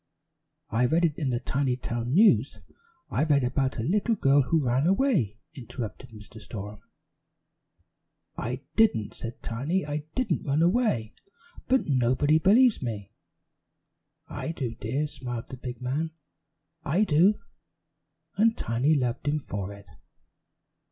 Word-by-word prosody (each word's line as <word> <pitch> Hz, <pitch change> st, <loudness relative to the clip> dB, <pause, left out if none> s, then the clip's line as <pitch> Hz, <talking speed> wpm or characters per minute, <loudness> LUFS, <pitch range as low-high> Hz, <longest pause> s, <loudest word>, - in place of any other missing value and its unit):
"I 120 Hz, +2 st, +2 dB
read 165 Hz, +6 st, +3 dB
it 155 Hz, -3 st, -1 dB
in 145 Hz, -5 st, -1 dB
the 120 Hz, -1 st, 0 dB
Tinytown 125 Hz, -2 st, -2 dB
News. 215 Hz, +3 st, +4 dB, 0.5 s
I -, -, +1 dB
read 145 Hz, -4 st, +3 dB
about 130 Hz, +1 st, 0 dB
a 110 Hz, -, -2 dB
little 205 Hz, -, +1 dB
girl 140 Hz, -6 st, +4 dB
who 155 Hz, +3 st, +1 dB
ran 125 Hz, +5 st, +2 dB
away," 190 Hz, -, +2 dB, 0.2 s
interrupted 125 Hz, -1 st, -7 dB
Mr. 110 Hz, 0 st, -13 dB
Storem. 105 Hz, -1 st, -8 dB, 1.6 s
"I 125 Hz, +4 st, -4 dB
didn't," 165 Hz, -, +2 dB
said 115 Hz, 0 st, -8 dB
Tiny. 145 Hz, +11 st, -1 dB
"I 145 Hz, 0 st, -2 dB, 0.2 s
didn't 225 Hz, -10 st, 0 dB
run 145 Hz, +4 st, +2 dB
away, 175 Hz, -, +1 dB, 0.5 s
but 265 Hz, 0 st, +2 dB
nobody 135 Hz, +3 st, +2 dB
believes 225 Hz, +7 st, +4 dB
me." 110 Hz, -6 st, -5 dB, 1.2 s
"I 160 Hz, -, -4 dB
do, 125 Hz, -8 st, -3 dB
dear," 130 Hz, +7 st, -2 dB
smiled 125 Hz, -5 st, -6 dB
the 130 Hz, -, -8 dB
big 125 Hz, 0 st, -7 dB
man. 145 Hz, +6 st, -1 dB, 0.7 s
"I 175 Hz, +9 st, +2 dB
do!" 185 Hz, +3 st, +4 dB, 1.0 s
and 225 Hz, +2 st, +3 dB
Tiny 125 Hz, +7 st, +1 dB
loved 125 Hz, 0 st, -1 dB
him 150 Hz, +1 st, +2 dB
for 100 Hz, -8 st, -5 dB
it. 100 Hz, 0 st, -12 dB
135 Hz, 130 wpm, -27 LUFS, 120-165 Hz, 1.6 s, News